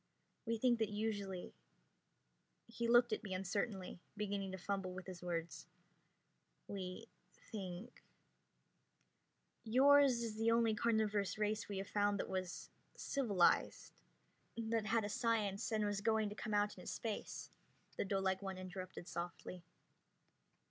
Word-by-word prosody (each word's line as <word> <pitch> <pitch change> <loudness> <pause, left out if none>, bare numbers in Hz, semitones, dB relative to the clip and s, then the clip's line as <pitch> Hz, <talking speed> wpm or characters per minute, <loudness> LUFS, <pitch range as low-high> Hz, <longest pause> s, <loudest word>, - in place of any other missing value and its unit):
We 230 0 +1
think 240 0 +3
that 220 -2 +1
usually 205 -3 -3 0.6
..." - - -44
He 235 - 0
looked 240 -1 +6
at - - -1
me 190 -3 -3
uncertainly, 190 0 -2 0.2
beginning 200 -2 -2
to 190 - -4
fumble 190 -1 -2
his 185 -2 -7
words. 170 -1 -3 1.0
"We 185 -2 -5 0.4
think 195 +2 -6 0.8
..." - - -44
"Yours 260 +1 +6
is 220 -2 -3
the 225 +1 +3
only 230 -1 +4
carnivorous 210 -3 +1
race 215 0 0
we 200 - -3
have 195 +1 -3
found 205 -1 +2
that - - -2
was 185 -1 -3 0.3
civilized, 210 -11 +2 0.6
that 225 -1 0
had 225 -1 +2
a - - -1
science 215 -3 0
and 215 -1 +2
was 205 -1 -1
going 220 -1 +2
to 205 - -7
come 215 -1 -2
out 205 -2 +1
into - - -10
space," 220 -3 -4 0.4
the - - 0
doelike 190 -1 0
one 190 -1 -4
interrupted 185 -1 -7
softly. 175 +1 -5
205 Hz, 135 wpm, -38 LUFS, 190-225 Hz, 1.0 s, looked